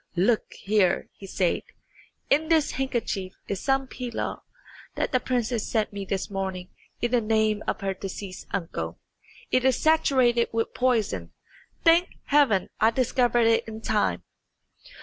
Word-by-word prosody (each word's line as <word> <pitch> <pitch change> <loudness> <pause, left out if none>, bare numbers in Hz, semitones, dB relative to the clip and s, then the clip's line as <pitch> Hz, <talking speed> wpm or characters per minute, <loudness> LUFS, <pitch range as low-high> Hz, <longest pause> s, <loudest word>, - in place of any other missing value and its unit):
"Look 210 +6 +1
here," 195 -3 +1
he 195 - -11
said, 185 -2 0 0.7
"in 305 +3 +3
this 320 -3 +3
handkerchief 230 -8 -2
is 195 - -2
some 270 +2 +1
pilaw 250 -2 -4 0.5
that - - -1
the 255 - +3
princess 240 -3 -1
sent 215 -3 0
me 200 -1 -5
this 190 0 -2
morning 190 -2 -4 0.3
in 240 - 0
the 245 -2 +3
name 215 -1 +1
of - - -2
her 195 -1 -1
deceased 190 0 -7
uncle. 80 - -4 0.5
It 255 - +3
is 260 -1 +3
saturated 260 -7 +3
with 225 0 -1
poison. 215 - 0 0.5
Thank 335 +2 +5
Heaven, 275 -10 +3
I 220 - +5
discovered 240 0 +2
it 230 0 +3
in 220 0 -7
time!" 205 - 0
225 Hz, 145 wpm, -26 LUFS, 195-255 Hz, 0.7 s, Thank